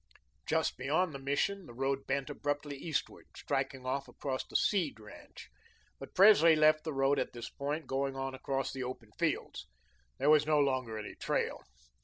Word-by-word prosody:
Just - - +1
beyond 155 +6 +1
the 140 - -6
Mission, 160 +7 -1
the 120 - -12
road 135 +1 -1
bent 140 +1 -1
abruptly 145 0 -3
eastward, 150 +2 -4
striking 130 -1 -2
off 135 +2 -2
across 130 -2 -4
the - - -16
Seed 175 - +1
ranch. 105 - -13 0.5
But - - -10
Presley 180 -5 +7
left 155 0 +4
the 160 - -2
road 135 0 +2
at - - -2
this 120 -1 -7
point, 145 +3 -3
going 135 0 -1
on 135 0 -3
across 135 0 -2
the 135 - -5
open 125 -4 -7
fields. - - -2 0.5
There 150 - +3
was 150 -1 +5
no 155 -1 +4
longer 130 -5 0
any 105 - -6
trail. - - -2
140 Hz, 175 wpm, -32 LUFS, 135-155 Hz, 0.5 s, Presley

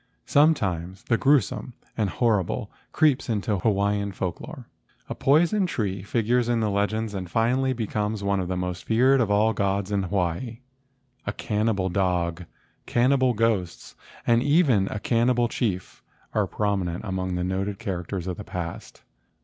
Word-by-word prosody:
Sometimes 95 - +1
the 115 - +1
gruesome 135 -2 +2 0.2
and 105 -3 0
horrible 105 -4 0 0.2
creeps 145 -5 +2
into 105 -2 0
Hawaiian 100 0 +1
folk 90 -2 -4
lore. - - -9 0.4
A - - -4
poison 175 +8 +3
tree 100 - -2
figures 120 +4 0
in 120 -1 +2
the 110 -2 0
legends 105 +2 -1
and 95 -3 -5
finally 125 +6 +1
becomes 110 -3 -2
one 100 -1 +1
of 90 - -2
the 90 0 -2
most 90 0 -3
feared 130 +4 +4
of 110 - +1
all 105 +2 +3
the - - 0
gods 100 0 0
of 100 -2 0
Hawaii. 100 +6 -2 0.7
A - - +1
can 105 0 -1
xii - - +4
INTRODUCTION 110 - +1
nibal 95 -2 -2
dog, 90 -2 0 0.4
cannibal 130 +1 +3
ghosts, 105 -6 -1 0.3
and 115 0 +4
even 140 - +3
a 105 - -4
cannibal 120 +2 +2
chief 100 -7 -3 0.3
are 105 -3 +1
prominent 95 -2 -1
among 95 -2 -2
the 90 - -1
noted 95 +2 -2
characters 95 -3 -4
of 90 -2 -4
the 105 - -6
past. 85 -3 -7
105 Hz, 165 wpm, -25 LUFS, 95-120 Hz, 0.7 s, feared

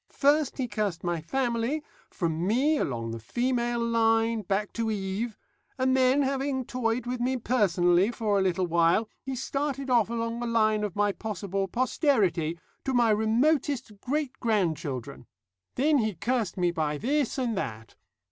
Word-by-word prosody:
First 290 0 +2
he 260 -3 -1
cursed 210 -7 -2
my 175 -2 -1
family, 245 - -1 0.3
from 170 0 -2
me 275 +8 +2
along 115 -3 -2
the 115 - -5
female 240 - -1
line 225 -1 +2
back 200 +1 -2
to 230 -1 -1
Eve, 205 +2 -3 0.4
and 260 0 +2
then, 260 +2 +4
having 270 -1 -1
toyed 240 -1 -1
with 250 0 -3
me 255 +2 0
personally 190 -6 +3
for 215 -4 0
a - - +2
little 185 -1 +1
while, 170 +5 +3
he 270 -1 -4
started 275 +1 -2
off 230 -4 +4
along 230 0 -2
the 240 - -3
line 215 -2 +2
of 205 -4 -3
my 205 0 +2
possible 195 -2 -3
posterity 200 - +1 0.3
to 265 -1 -1
my 235 -2 +4
remotest 240 +4 +1
great 285 0 -1
grandchildren. 165 - -2 0.5
Then 290 +2 +3
he 215 -4 -1
cursed 225 -1 -1
me 175 -1 +2
by 155 -3 -1
this 280 - 0
and 245 -4 -1
that. 115 - -5
225 Hz, 155 wpm, -27 LUFS, 190-255 Hz, 0.5 s, then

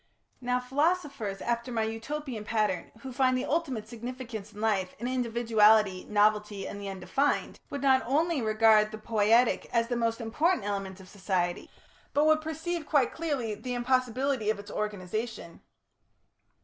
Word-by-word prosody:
Now 250 0 0
philosophers 275 - -1
after 235 +1 -2
my 225 -2 0
Utopian 230 +2 -4
pattern, 210 -5 -1
who 260 0 -7
find 255 0 +2
the 255 - -2
ultimate 270 -9 -1
significance 235 -2 -7
in 210 - -12
life 205 -4 0
in 235 - -4
individuality, 220 -5 +3
novelty 210 -1 +2
and 205 - -7
the 200 - -5
undefined, 230 +10 -1
would 280 -1 -5
not 265 -1 +5
only 310 +2 +1
regard 215 -1 +4
the 215 - -7
poietic 225 +2 +2
element - - -7
as 230 0 +3
the 245 - 0
most 230 0 0
important 255 - +1
in 205 - -1
human 195 -1 -4
society, 185 -2 -2 0.5
but 295 +1 +4
would 310 0 +4
perceive 320 +1 -4
quite 285 -5 +3
clearly 285 -9 -2
the 250 +4 -5
impossibility 255 -1 0
of 215 - +1
its 205 0 -10
organisation. 210 -2 -4
230 Hz, 155 wpm, -29 LUFS, 210-265 Hz, 0.5 s, not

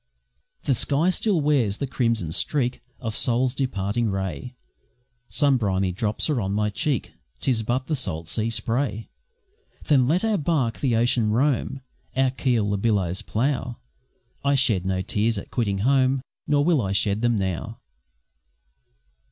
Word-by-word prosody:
The 140 - +2
sky 145 +8 +2
still 190 -3 +1
wears 130 -9 +2
the 140 - -2
crimson 115 - -1
streak 125 - 0 0.2
Of 115 -3 -4
Sol's 125 +1 +2
departing 115 -4 -1
ray, 95 - -4 0.7
Some 140 +1 +3
briny 95 -4 0
drops 105 +4 0
are 145 -7 0
on 95 0 -2
my 105 0 0
cheek, 140 +3 -2 0.3
'Tis 120 - +1
but 120 +4 -1
the 155 - -1
salt 85 - -3
sea 110 +5 0
spray! 115 -1 -2 0.7
Then 135 -5 +3
let 175 +9 +2
our 215 -3 +1
barque 140 -7 0
the 125 -5 +1
ocean 115 -1 +2
roam, 135 +3 0 0.3
Our 130 0 +3
keel 125 -5 +1
the 100 - 0
billows 95 -5 +1
plough; 125 +1 -1 0.7
I 140 0 +3
shed 105 -9 +2
no 95 0 0
tears 110 +4 0
at - - -7
quitting 105 -5 0
home, 130 -1 +3 0.2
Nor 145 0 +3
will 165 -5 +3
I 95 -2 -1
shed 100 +2 +1
them 120 -2 +2
now! 95 +4 -3
120 Hz, 150 wpm, -24 LUFS, 105-135 Hz, 0.7 s, Some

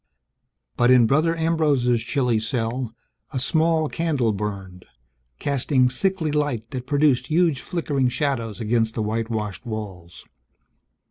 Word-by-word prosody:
But 120 0 +4
in 125 -2 +6
Brother 155 +7 +2
Ambrose's 150 -8 +2
chilly 125 -1 0
cell, 115 +1 -3 0.4
a 140 - -4
small 160 +3 +2
candle 145 -9 0
burned 95 -3 -5 0.5
casting 130 -2 +1
sickly 170 +3 0
light 145 -7 -1
that 130 -2 -5
produced 140 -3 +2
huge 160 -3 +2
flickering 145 -7 -1
shadows 125 -6 -2
against 115 0 0
the 110 - -1
whitewashed 110 -1 -3
walls. 100 -7 -7
125 Hz, 120 wpm, -23 LUFS, 115-150 Hz, 0.5 s, in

